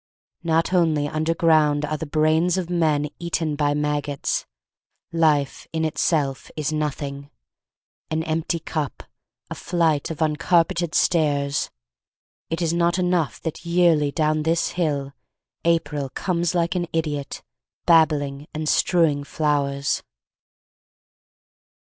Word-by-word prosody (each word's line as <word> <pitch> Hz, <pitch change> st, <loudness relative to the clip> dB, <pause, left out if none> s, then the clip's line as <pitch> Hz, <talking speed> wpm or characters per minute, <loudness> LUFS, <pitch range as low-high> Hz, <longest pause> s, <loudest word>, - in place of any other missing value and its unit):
Not 165 Hz, +2 st, +1 dB
only 160 Hz, -5 st, +2 dB
under 155 Hz, +2 st, -1 dB
ground 155 Hz, -3 st, +3 dB
are 155 Hz, +1 st, -2 dB
the 155 Hz, +1 st, -5 dB
brains 160 Hz, +4 st, +2 dB
of 180 Hz, -2 st, -3 dB
men 155 Hz, -4 st, +2 dB
Eaten 165 Hz, -3 st, -1 dB
by 145 Hz, 0 st, +1 dB
maggots, 145 Hz, -1 st, -1 dB, 0.7 s
Life 150 Hz, -4 st, +1 dB
in 160 Hz, 0 st, -1 dB
itself 150 Hz, -3 st, 0 dB
Is 155 Hz, 0 st, -1 dB
nothing, 140 Hz, -2 st, -3 dB, 0.8 s
An 160 Hz, 0 st, -1 dB
empty 165 Hz, +1 st, -1 dB
cup, 155 Hz, -3 st, -4 dB, 0.5 s
a -, -, -1 dB
flight 165 Hz, -4 st, 0 dB
of 160 Hz, -, -6 dB
uncarpeted 165 Hz, +2 st, +1 dB
stairs. 145 Hz, -4 st, +1 dB, 0.8 s
It 165 Hz, +2 st, -2 dB
is 165 Hz, 0 st, +1 dB
not 170 Hz, +1 st, +2 dB
enough 180 Hz, -4 st, 0 dB
that 160 Hz, -, -5 dB
yearly, 170 Hz, -4 st, +3 dB
down 155 Hz, 0 st, +1 dB
this 165 Hz, +2 st, +1 dB
hill, 145 Hz, -5 st, -2 dB, 0.5 s
April 155 Hz, -4 st, 0 dB
Comes 175 Hz, +3 st, -1 dB
like 170 Hz, -1 st, +1 dB
an 175 Hz, -2 st, -1 dB
idiot, 150 Hz, -4 st, -3 dB, 0.4 s
babbling 150 Hz, -4 st, +3 dB
and 155 Hz, 0 st, -3 dB
strewing 155 Hz, -4 st, +2 dB
flowers. 140 Hz, -2 st, 0 dB
155 Hz, 120 wpm, -23 LUFS, 145-170 Hz, 0.8 s, ground